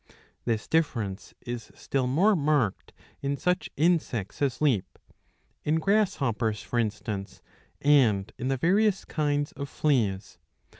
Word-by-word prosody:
This 115 -3 -1
difference 115 -12 -1
is 120 -2 -6
still 130 -2 -1
more 185 +11 +4
marked 145 - 0 0.3
in 140 0 -1
such 180 +4 0
insects 150 - 0
as 135 -3 0
leap, 130 -11 +1 0.7
in 150 - +1
grasshoppers 150 - +1
for 120 - -1
instance 105 -2 -3 0.4
and 125 -9 +4
in 130 - -2
the 135 0 +1
various 195 - +2
kinds 145 -1 -1
of 140 -1 -6
fleas. 105 - 0
135 Hz, 120 wpm, -27 LUFS, 110-155 Hz, 0.7 s, more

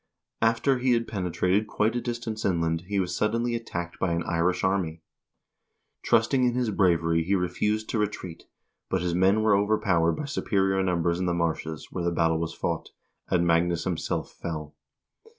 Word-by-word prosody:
After 115 +4 +2
he 125 0 +3
had 115 -1 0
pene 95 -5 -3
trated 95 +6 +1
quite 110 +3 0
a 120 - 0
distance 120 -2 -4
inland 85 -2 0
he 100 0 0
was 90 -1 -1
suddenly 115 +4 0
attacked 90 -7 -5
by 90 -3 +1
an 85 0 -1
Irish 90 +2 0
army. 90 -4 0 1.0
Trusting 125 +4 +3
in 120 -1 +2
his 125 -3 0
bravery 85 -4 +2
he 95 +4 +1
refused 105 +4 -1
to 110 - -1
retreat, 95 -5 -4 0.4
but 95 -2 0
his 90 -1 0
men 95 +5 +3
were 105 -2 +4
overpowered 100 -5 +2
by 150 - -4
superior 95 -8 0
numbers 85 -2 0
in 90 - -1
the 85 - +1
marshes 80 -2 -2
where 90 - -3
the 85 - +2
battle 80 -1 +1
was 80 0 -3
fought, - - -3 0.4
and 85 -1 +2
Magnus 85 0 +2
himself 90 -3 -2
fell. 75 -3 -6
95 Hz, 175 wpm, -26 LUFS, 85-110 Hz, 1.0 s, were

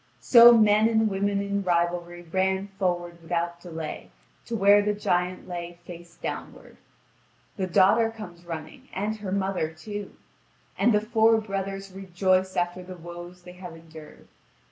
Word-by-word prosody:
So 235 -1 +8
men 215 0 +4
and 220 -1 +2
women 200 +1 0
in 200 0 -2
rivalry 175 -1 -1
ran 190 +3 -1
forward 175 -2 -2
without 170 0 -3
delay 165 -3 -7 0.4
to 235 - -3
where 205 0 +5
the 210 0 0
giant 180 -2 -1
lay 175 -1 -6
face 170 -1 -11
downward. - - -7 0.8
The 190 -2 -1
daughter 200 +6 +4
comes 180 -6 -10
running, 160 -2 -8
and 210 +3 -2
her 200 -3 -6
mother 190 -4 -1
too. 205 +5 -8 0.6
And 240 - +3
the 210 -1 +3
four 225 0 +3
brothers 195 -2 -5
rejoice 185 0 0
after 175 +1 -1
the 180 0 -10
woes 175 +1 -10
they 180 - -11
have 180 -2 -10
endured. 160 -2 -14
185 Hz, 145 wpm, -26 LUFS, 175-205 Hz, 0.8 s, So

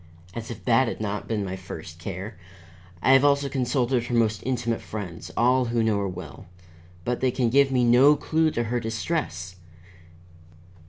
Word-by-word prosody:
As 115 0 -6
if 115 -2 -8
that 120 +1 +4
had - - -4
not 105 -1 -3
been 105 -3 -1
my 95 0 -4
first 85 -3 -9
care! 95 +4 -6 0.7
I - - +5
have 135 0 +6
also 140 0 +3
consulted 125 -2 0
her 120 - -1
most 110 -2 +1
intimate 120 -2 -1
friends, 90 -5 -7
all 125 +2 +3
who 115 -1 0
know 110 -2 +1
her 100 - -1
well, 90 - -9 0.6
but 125 - -1
they 130 - +2
can 120 -2 0
give 140 +1 +4
me 125 -2 +2
no 125 +5 +6
clue 160 +1 +1
to 120 -6 -1
her 120 +2 -1
distress. 110 - -3
120 Hz, 175 wpm, -25 LUFS, 105-130 Hz, 0.7 s, have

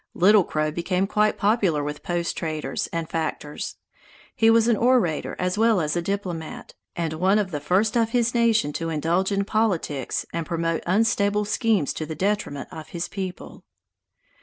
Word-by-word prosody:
Little 200 +2 +6
Crow 155 -2 -1
became 180 +4 0
quite 210 +1 +1
popular 200 -8 +2
with 150 0 -5
post 175 -1 -2
traders 155 -4 -3
and 165 -1 -4
factors. 155 -2 -4 0.6
He 225 - +4
was 225 0 +5
an 235 - +4
orator 230 -9 +1
as 180 +3 -1
well 225 -3 +4
as 150 -1 -1
a 175 - 0
diplomat, 175 -4 -4 0.2
and 165 -2 -2
one 185 +6 +2
of 200 -3 -1
the 150 - -2
first 190 +10 +1
of 230 -1 +2
his 235 -1 +1
nation 225 -10 +2
to 165 +2 -3
indulge 165 +5 0
in 200 0 0
politics 185 - -1
and 170 - -1
promote 165 0 -1
unstable 205 +1 +2
schemes 210 - +1
to 155 - -5
the 160 - -5
detriment 190 -5 -2
of 155 -1 -8
his 170 -2 -4
people. 190 -2 -7
180 Hz, 170 wpm, -24 LUFS, 160-210 Hz, 0.6 s, Little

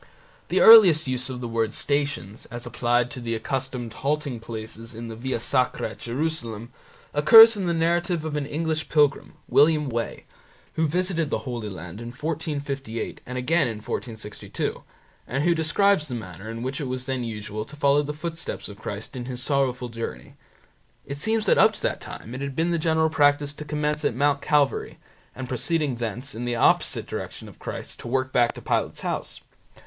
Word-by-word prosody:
The - - +2
earliest 185 -10 +9
use 125 0 -1
of 125 -1 -5
the 120 - -3
word 115 -2 -1
Stations, 140 -9 -2
as 120 0 -7
applied 120 +1 +1
to 135 - -6
the 115 -1 -2
accustomed 125 0 -3
halting 140 -2 -2
places 115 0 -7
in 115 +1 -6
the 110 - -6
Via 125 +1 -3
Sacra 125 -2 0
at - - -13
Jerusalem, 120 -4 -3 0.4
occurs 225 +10 +9
in 195 -3 -2
the 170 - +1
narrative 170 0 +1
of 155 -1 -3
an 145 -2 -2
English 160 +1 -2
pilgrim, 145 -2 +2
William 150 -1 +4
Wey, 115 -1 -3 0.5
who 160 0 +1
visited 170 -1 0
the - - -2
Holy 120 -4 -4
Land 90 +2 -8
in 120 - -6
1458 140 -3 -4
and 125 +1 -4
again 140 +4 +2
in 115 - -3
1462, 110 -1 -5 0.5
and 135 +4 -1
who 170 +1 +4
describes 165 +1 +2
the 125 - -4
manner 95 -1 -8
in 115 +1 -5
which 130 +4 -3
it 140 - -3
was 130 0 -4
then 130 -1 -2
usual 110 -1 -5
to 140 +7 -12
follow 145 0 +3
the 150 0 -4
footsteps 165 +2 -5
of 100 0 -11
Christ 105 +4 -6
in 125 -1 -5
His 125 -1 -5
sorrowful 130 -3 0
journey. 115 - -6 0.7
It 140 0 -6
seems 220 +5 +1
that - - +4
up - - +6
to - - -8
that - - -1
time 115 - -8
it 130 - -5
had 140 -1 -4
been 165 +3 +1
the 170 - +1
general 160 0 +2
practice 145 -1 +3
to 150 - -8
commence 150 0 -1
at 135 - +1
Mount 140 +1 +2
Calvary, 145 -2 +1 0.4
and 130 -1 -6
proceeding 140 +1 0
thence, 120 +4 -4
in 120 +2 -5
the 120 0 -1
opposite - - +3
direction - - -6
to - - -11
Christ, - - -7
to - - -8
work 130 +1 -1
back 120 -1 +3
to - - -10
Pilate's - - -1
house. - - -3
135 Hz, 190 wpm, -25 LUFS, 120-150 Hz, 0.7 s, earliest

